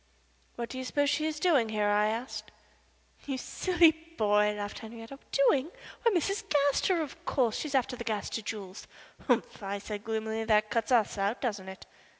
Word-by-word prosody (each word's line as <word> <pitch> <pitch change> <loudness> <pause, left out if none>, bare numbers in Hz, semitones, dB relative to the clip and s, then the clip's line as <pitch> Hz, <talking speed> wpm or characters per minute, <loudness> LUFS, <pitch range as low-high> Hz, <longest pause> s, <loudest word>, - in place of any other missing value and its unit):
"What 235 -1 -4
do 260 - -5
you - - -3
suppose 285 +2 +1
she 310 0 +1
is 305 -1 -3
doing 295 -10 +3
here?" 210 -1 +1
I 205 +1 +3
asked. 230 +4 -4 0.8
"You 270 -2 -1
silly 345 +3 +4 0.3
boy," 210 0 +3
laughed 205 0 -5
Henriette. 225 0 -10 0.2
"Doing? 275 +1 +3 0.3
Why, 465 - +4
Mrs. 395 +3 0
Gaster, 295 +4 +2
of 290 - -10
course. 245 -5 +1
She - - -3
is 280 - -3
after 260 -1 +1
the 235 - -6
Gaster 220 0 -2
jewels." 205 -3 -7 0.4
"Humph!" - - +1
I 200 0 -3
said, 205 0 -6
gloomily. 220 0 -2
"That 215 -1 +2
cuts 230 +3 0
us 220 -4 +3
out, 200 +5 0
doesn't 205 -6 -2
it?" 190 - -10
230 Hz, 180 wpm, -30 LUFS, 210-280 Hz, 0.8 s, silly